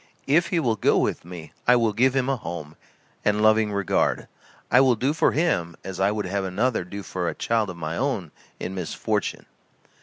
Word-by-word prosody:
If 160 +5 +3
he 175 - 0
will 115 -7 +1
go - - +3
with - - 0
me 85 -3 -9
I 125 - +7
will 115 -3 +2
give 130 +5 +3
him 130 -1 +1
a 135 - +1
home, 85 - -7 0.5
and 105 0 +2
loving 110 0 +4
regard 100 -2 0 0.4
I 125 - +7
will 130 -2 +4
do 130 +6 0
for 160 - +2
him 90 - 0
as 95 - -6
I 95 +1 +3
would 105 -1 -2
have 100 +1 -2
another 100 +4 0
do 100 +3 -7
for 90 -3 -2
a - - -5
child 110 -3 0
of 90 - -7
my 80 0 -4
own 115 - -1 0.3
in 95 - -4
misfortune." 90 -4 -2
105 Hz, 205 wpm, -24 LUFS, 90-125 Hz, 0.5 s, I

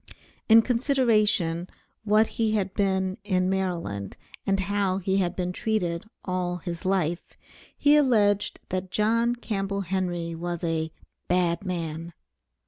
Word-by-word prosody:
In 225 +1 +8
considering 225 - +2 0.4
what 215 +1 +4
he 220 -2 0
had 195 -3 0
been 190 -1 0
in 185 -2 +1
Maryland 170 - -2 0.3
and 195 -1 +2
how 195 -1 0
he 190 0 0
had 180 -3 0
been 180 -1 -2
treated 180 -5 -1 0.2
all 180 -1 -1
his 170 -1 -6
life, 175 -3 -1 0.4
he 295 0 +5
alleged 215 -8 +3
that 185 0 -3
John 230 +4 +2
Campbell 200 -4 -2
Henry 175 -2 -2
was 175 +1 -4
a 160 -1 -1 0.4
"bad 175 0 +1
man." 170 -2 -4
190 Hz, 130 wpm, -26 LUFS, 175-210 Hz, 0.4 s, In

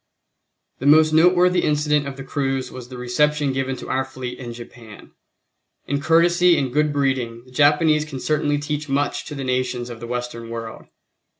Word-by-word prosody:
The 135 - -2
most 155 +1 +6
noteworthy 180 +2 +4
incident 150 -1 +1
of 135 -1 -7
the 135 - -7
cruise 135 -1 -2
was 125 -1 -9
the 130 - -9
reception 145 +3 +1
given 135 0 -2
to - - -9
our 135 0 0
fleet 130 -2 -7
in 120 -2 -7
Japan. 115 -2 -12 0.7
In 140 +1 -2
courtesy 170 +2 +4
and 130 -3 -2
good 150 +1 +2
breeding, 130 -5 -1
the 130 - -18
Japanese 150 +3 +3
can 150 -4 -7
certainly 145 +1 0
teach 150 0 -4
much 140 +1 -1
to 150 - -7
the 135 - -5
nations 125 -1 -2
of 115 - -9
the 120 - -7
Western 120 -1 -5
world. 115 -1 -7
135 Hz, 180 wpm, -21 LUFS, 125-150 Hz, 0.7 s, most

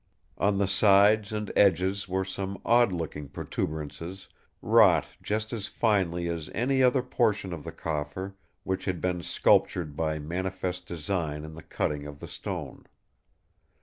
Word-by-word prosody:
On 100 0 +2
the 100 - +2
sides 100 +2 +5
and 105 -1 -3
edges 95 +1 +3
were 95 +1 0
some 95 +1 -4
odd 120 -2 +5
looking 75 -5 -4
protuberances 80 +5 -5 0.3
wrought 100 -9 +5 0.2
just 110 +1 -2
as 105 -3 -2
finely 90 -6 +1
as 85 -2 -4
any 130 +4 +2
other 125 0 +4
portion 110 -7 0
of 80 -4 -7
the - - -6
coffer 80 +5 -4 0.3
which 95 0 -2
had 95 -3 -1
been 90 -1 -1
sculptured 80 -3 +2
by 80 0 -1
manifest 90 +3 -3
design 80 -3 -3
in 80 - -9
the 80 - -10
cutting 75 0 -2
of 70 -1 -10
the - - -8
stone. - - -6
95 Hz, 150 wpm, -28 LUFS, 80-100 Hz, 0.3 s, sides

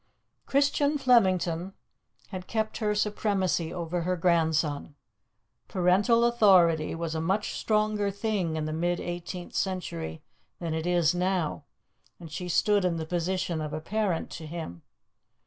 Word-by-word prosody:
Christian 285 +1 +2
Flemington 190 - +2 0.6
had 185 -1 -7
kept 220 -1 -2
her 210 -2 0
supremacy 200 -5 0
over 170 0 -3
her 180 +2 -1
grandson. 160 -4 +1 0.7
Parental 200 +6 +3
authority 185 -10 +4
was 165 -1 -3
a 160 - -2
much 190 +6 0
stronger 215 -1 +1
thing 200 -5 -1
in 155 -1 -2
the 155 - -3
mid 175 +2 0
eighteenth 175 +1 -6
century 85 - -3 0.3
than 165 -2 -3
it 160 +1 -2
is 175 -2 +3
now, 180 -3 -1 0.5
and 165 -2 -10
she 180 +3 -5
stood 205 +3 +3
in 175 -2 +1
the 160 - -3
position 175 0 -1
of 150 0 -4
a 155 - -2
parent 195 0 -1
to 160 - -7
him. 155 - -7
180 Hz, 140 wpm, -28 LUFS, 165-205 Hz, 0.7 s, authority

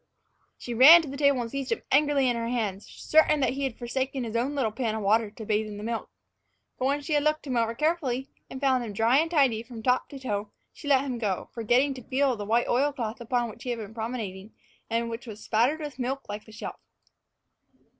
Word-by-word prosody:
She 240 - -6
ran 305 +8 +9
to - - -7
the 275 - -6
table 280 -3 +3
and 230 -1 -5
seized 275 -1 -4
him - - -1
angrily 285 -1 +3
in 245 - +1
her 230 0 -2
hands, 215 -5 -2
certain 305 -1 +3
that 260 - +2
he 275 +1 -2
had 260 -4 -4
forsaken 260 +2 -2
his 230 -1 -5
own 255 +5 0
little 250 -6 0
pan 225 -1 -2
of 220 - -4
water 215 +2 +3
to 220 +1 -10
bathe 215 0 0
in 205 -1 -7
the 205 - -7
milk. 230 +1 -3 0.7
But 255 - 0
when 285 +1 0
she 295 +2 -3
had 295 - +3
looked 305 0 0
him 260 -3 -2
over 230 -1 +1
carefully, 280 -4 0 0.2
and 265 - -7
found 260 -3 +2
him 215 -3 -6
dry 230 +6 +3
and 325 +1 +1
tidy 270 -9 +3
from 230 -1 -10
top 250 +1 +1
to 280 - -8
toe, 210 -6 -3 0.2
she 290 - -10
let 275 -2 +5
him 250 -3 -3
go 210 -4 +1
again, - - -7
forgetting 245 +5 +2
to 260 - -9
feel 270 +3 +1
of 235 - -4
the 205 - -4
white 230 +3 +2
oil 280 +4 +2
cloth 235 -4 -5
upon 240 0 0
which - - -16
he 255 - -5
had 240 - -1
been 215 -1 -8
promenading, 220 -3 -5 0.3
and 230 +1 0
which 230 +2 -7
was 215 -1 -9
spattered 240 +8 +2
with 290 -4 -7
milk 265 +2 -3
like 210 +1 -6
the 220 - -15
shelf. 210 - -7
245 Hz, 245 wpm, -27 LUFS, 225-275 Hz, 0.7 s, ran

